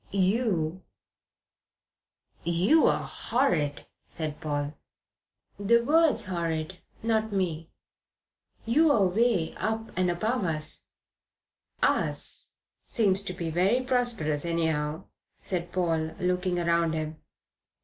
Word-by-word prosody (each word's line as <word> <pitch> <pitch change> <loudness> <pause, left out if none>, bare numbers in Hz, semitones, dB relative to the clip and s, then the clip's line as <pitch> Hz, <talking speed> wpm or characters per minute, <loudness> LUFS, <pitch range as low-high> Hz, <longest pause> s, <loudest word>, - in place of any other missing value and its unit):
You 190 -4 +1 0.8
" - - -42
"You're 180 - +4
horrid," 175 - -1 0.2
said 155 -2 -4
Paul. 145 -1 -2 0.9
"The 235 +4 +4
word's 315 +1 +3
horrid, 170 -1 -3 0.2
not 220 -1 +1
me. 170 -5 -2 1.0
You're 290 +4 +4
away 195 -2 +2
up 220 0 -3
above 185 +6 0
us." 155 -2 -2 1.0
"'Us' - - 0 0.4
seems 200 -4 +2
to 195 -2 -4
be 165 -2 -4
very 190 +9 +2
prosperous, 240 - 0
anyhow," 160 -1 -1 0.4
said 175 -2 -3
Paul, 160 -3 0
looking 180 0 0
round 170 -1 +1
him. 155 0 -4
180 Hz, 95 wpm, -28 LUFS, 160-220 Hz, 1.0 s, You're